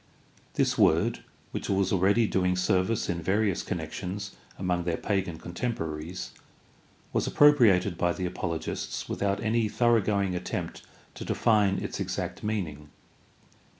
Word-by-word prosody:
This - - +1
word, - - +3 0.3
which - - -4
was 95 -1 +1
already 100 +5 +4
doing 90 -3 +1
service 95 +4 +1
in 85 -1 -2
various 100 +1 +1
connections 100 +2 -5 0.2
among 90 -2 -1
their 85 -1 -1
pagan 95 -5 -1
contempo 90 +8 -4
raries, 80 +4 -6 0.8
was - - +1
appropriated 105 - +5
by 85 - +2
the 90 - -3
apologists 85 -2 -3
without 100 0 -1
any 110 -1 +1
thoroughgoing 105 -5 +2
attempt 90 0 -4 0.3
to - - -7
define 105 -4 +2
its - - -4
exact - - -3
meaning. 80 -9 -3
95 Hz, 125 wpm, -28 LUFS, 90-105 Hz, 0.8 s, appropriated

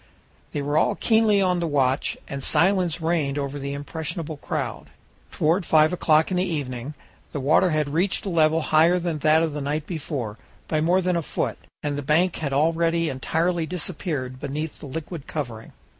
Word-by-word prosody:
They 145 - -3
were 145 +2 +2
all 205 - +2
keenly 220 -3 +3
on 180 -1 +2
the 170 - -1
watch, 135 -3 +1
and 140 0 -5
silence 180 +1 +2
reigned 160 -4 0
over 140 0 -3
the 140 0 -4
impressionable 160 +2 -5
crowd. - - -4 0.4
Toward 165 +5 +1
five 155 0 +4
o'clock 160 -1 +3
in 185 - +1
the 180 - +2
evening 145 -5 -4 0.4
the 145 - -2
water 155 +7 +4
had 155 -2 +1
reached 175 +8 0
a - - -1
level 160 -1 +3
higher 160 +4 +4
than 170 -3 -2
that 155 +2 +4
of 160 -2 -1
the 150 - -4
night 150 +2 -2
before 140 - -4 0.3
by 155 -1 0
more 175 +4 +3
than 180 -1 0
a 170 - +1
foot - - -3 0.2
and 145 -1 -1
the - - -2
bank 160 +6 +2
had 145 -4 -3
already 165 +3 +2
entirely 160 +5 -1
disappeared 150 -7 -3
beneath 150 +4 -4
the - - -8
liquid 160 +2 -6
covering. 120 -7 -5
155 Hz, 185 wpm, -24 LUFS, 145-170 Hz, 0.4 s, five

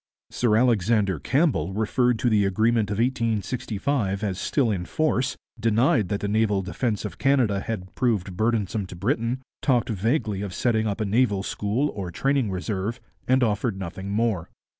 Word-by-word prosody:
Sir 115 -3 +2
Alexander 105 - +2
Campbell 130 - +1
referred 115 +3 +1
to 125 - 0
the 105 -2 +4
agreement 110 +2 +2
of 100 - -2
1865 115 -2 -1
as 100 -2 -2
still 130 -6 +1
in 90 -3 -2
force, 135 -2 0 0.2
denied 115 -2 +2
that 100 - -2
the 100 - -1
naval 105 -2 +1
defence 105 +3 -2
of - - -7
Canada 130 -8 +2
had 95 -3 -5
proved 105 -7 0
burdensome 110 -1 0
to 90 - -9
Britain, 120 +5 -1 0.2
talked 125 -4 +2
vaguely 110 - 0
of 100 -3 -5
setting 110 -3 +1
up 105 +2 -2
a - - +1
naval 105 -2 +2
school 110 +9 -1
or 95 -3 -5
training 135 +5 0
a - - -3
reserve, 100 +5 -3 0.3
and 130 0 +4
offered 105 -1 0
nothing 95 +1 -6
more. 105 -5 0
110 Hz, 165 wpm, -25 LUFS, 100-120 Hz, 0.3 s, the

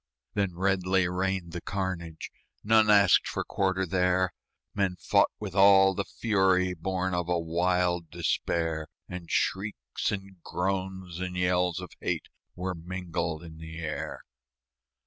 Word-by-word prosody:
Then 100 -4 0
redly 95 0 +2
rained 90 -1 -1
the 85 0 -5
carnage 90 -4 -4 0.3
None 110 0 +5
asked 100 -1 +6
for - - -2
quarter 95 -1 0
there; 90 +1 +2 0.4
Men 100 -3 0
fought - - +3
with - - -5
all 95 -1 +7
the 100 +1 -2
fury 95 -5 +2
Born 95 +2 -2
of 90 -1 -1
a 90 - +2
wild 85 0 +1
despair; 80 -1 -1 0.2
And 90 -2 -7
shrieks 95 - -1
and 95 -3 -6
groans 95 -1 -3
and 90 -1 -4
yells 90 0 +2
of 90 -2 -8
hate - - -2 0.3
Were 90 +1 -3
mingled 85 -2 -4
in 80 -1 -11
the 80 0 -8
air. 80 -2 -4
90 Hz, 135 wpm, -28 LUFS, 85-95 Hz, 0.4 s, all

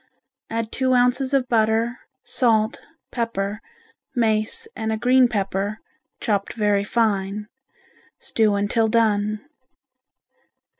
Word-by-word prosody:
Add 225 -1 -3
two 260 0 +1
ounces 250 +2 +2
of 270 -2 +2
butter, 225 +1 +1 0.3
salt, 220 -3 +1 0.3
pepper, 210 -3 -2 0.5
mace 225 - 0
and 220 0 -2
a 220 - 0
green 250 +2 +4
pepper, 200 -1 -2 0.4
chopped 200 -3 -1
very 205 -2 +1
fine, 210 -2 0 0.7
stew 215 -2 +1
until 210 +3 +1
done. 215 -2 +1
220 Hz, 100 wpm, -23 LUFS, 210-240 Hz, 0.7 s, green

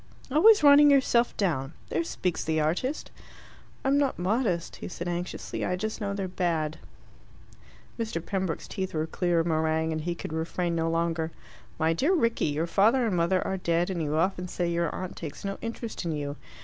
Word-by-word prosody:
"Always 390 +6 +6
running 290 0 +8
yourself 255 -4 +3
down! 155 -8 -1 0.2
There 165 - 0
speaks 175 +1 -2
the 160 0 0
artist!" 175 - -1 0.7
"I'm 275 +1 +3
not 280 -2 +1
modest," 185 -2 0
he - - -6
said 175 -1 -6
anxiously. 175 +1 -4
"I 180 - 0
just 220 +5 -4
know 200 -1 -2
they're 195 -2 -2
bad." 165 -4 -1 1.2
Mr. 220 -7 -2
Pembroke's 190 -5 -2
teeth 190 -4 -4
were 155 0 0
clear 170 +1 +1
of - - -3
meringue, 160 0 +1
and 160 0 -2
he 170 +2 -2
could 160 - -6
refrain 170 +2 -1
no 165 0 0
longer. 165 -1 0 0.5
"My 160 0 +2
dear 290 - +2
Rickie, 230 -8 +1
your 150 +2 0
father 225 +8 +3
and 210 -5 0
mother 175 +2 +2
are 190 - -1
dead, 175 0 0
and 175 -3 -2
you 150 -1 -1
often 180 +2 0
say 175 0 -2
your 170 -1 0
aunt 185 -1 -5
takes 160 +3 -7
no 195 0 -3
interest 230 -1 -5
in 170 -2 -2
you. 145 -1 -3
175 Hz, 190 wpm, -27 LUFS, 160-210 Hz, 1.2 s, running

